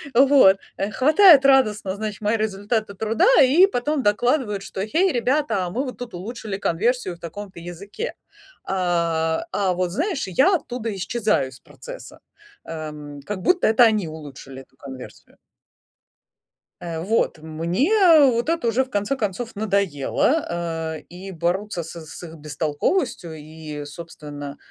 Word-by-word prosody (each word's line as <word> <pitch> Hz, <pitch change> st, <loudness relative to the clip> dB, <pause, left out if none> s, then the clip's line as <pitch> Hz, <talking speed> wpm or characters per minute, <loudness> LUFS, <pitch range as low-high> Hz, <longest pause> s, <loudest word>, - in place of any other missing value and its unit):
Вот, 265 Hz, -7 st, +6 dB, 0.2 s
э, 200 Hz, +2 st, -2 dB
хватает 305 Hz, -, +6 dB
радостно, 215 Hz, -8 st, +3 dB
значит, 215 Hz, 0 st, -5 dB
мои 210 Hz, +2 st, +1 dB
результаты 215 Hz, 0 st, -2 dB
труда 220 Hz, -, +1 dB
и 300 Hz, +9 st, +6 dB
потом 290 Hz, -3 st, -1 dB
докладывают, 210 Hz, -1 st, +1 dB
что: 190 Hz, -, -6 dB
"Гэй, 340 Hz, -, +2 dB
ребята, 240 Hz, -7 st, 0 dB
мы 260 Hz, +7 st, -2 dB
вот 255 Hz, -, -7 dB
тут 245 Hz, -1 st, -8 dB
улучшили 205 Hz, +2 st, -6 dB
конверсию 200 Hz, +1 st, 0 dB
в -, -, -21 dB
таком-то 190 Hz, +2 st, -8 dB
языке". 195 Hz, -, -6 dB, 0.5 s
А, 170 Hz, -, 0 dB
а, 190 Hz, -3 st, +1 dB
вот 180 Hz, 0 st, -1 dB
знаешь, 305 Hz, -, -2 dB
я 275 Hz, -, +3 dB
оттуда 240 Hz, -, -4 dB
исчезаю 210 Hz, -, 0 dB
из 130 Hz, 0 st, -15 dB
процесса. -, -, -11 dB, 0.5 s
Эм, 150 Hz, -3 st, -7 dB
как 205 Hz, -2 st, -4 dB
будто 360 Hz, -, +3 dB
это 225 Hz, +2 st, +5 dB
они 215 Hz, -6 st, +2 dB
улучшили 140 Hz, -4 st, -10 dB
эту -, -, -31 dB
конверсию. 130 Hz, -2 st, -11 dB, 1.4 s
Э, 165 Hz, -2 st, -5 dB
вот, 205 Hz, -2 st, 0 dB
мне 165 Hz, -, -1 dB, 0.4 s
вот 235 Hz, +3 st, -1 dB
это 330 Hz, -8 st, 0 dB
уже 250 Hz, +4 st, +2 dB
в 260 Hz, -, -21 dB
конце 205 Hz, +5 st, -1 dB
концов 220 Hz, +1 st, -3 dB
надоело, 200 Hz, -, 0 dB, 0.5 s
э, -, -, -12 dB
и 190 Hz, +2 st, -9 dB
бороться 175 Hz, +2 st, -2 dB
с 160 Hz, -, -9 dB, 0.2 s
с 160 Hz, -, -10 dB
их 165 Hz, -1 st, -9 dB
бестолковостью 160 Hz, -, -2 dB
и, 155 Hz, -1 st, -8 dB
собственно, 145 Hz, -2 st, -9 dB
200 Hz, 140 wpm, -22 LUFS, 165-245 Hz, 1.4 s, Вот